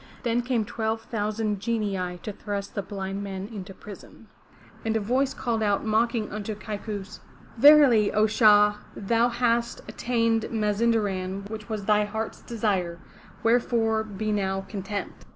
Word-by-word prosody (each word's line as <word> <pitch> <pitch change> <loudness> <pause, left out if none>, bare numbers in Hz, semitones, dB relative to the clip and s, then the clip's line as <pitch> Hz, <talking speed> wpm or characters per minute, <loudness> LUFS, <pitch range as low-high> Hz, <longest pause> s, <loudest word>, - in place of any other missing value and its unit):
Then 240 -1 +1
came 240 -3 0
twelve 225 +1 -2
thousand 215 -2 -2
Genii 200 -5 -2
to 210 - -4
thrust 200 -1 -5
the 200 - -2
blind 195 0 -5
men 195 -1 -5
into 195 -2 -7
prison. 200 +1 -12 0.5
And 225 0 +1
a - - 0
voice 255 +6 0
called 230 -2 -1
out 205 -1 +1
mocking 220 0 +1
unto 210 +1 -4
Kaikous: 210 -1 -6 0.4
"Verily, 275 -6 +7
O, 215 0 +3
Shah, 210 -1 +5 0.2
thou 230 +4 +2
hast 235 -1 0
attained 230 -2 0
Mazinderan 205 -3 0
which 215 0 -7
was 215 -3 -3
thy 210 0 +3
heart's 220 +2 -5
desire, 195 -7 -1 0.5
wherefore 225 -1 +2
be 215 0 -4
now 195 -2 0
content!" 195 +1 -5
215 Hz, 140 wpm, -26 LUFS, 200-230 Hz, 0.5 s, Verily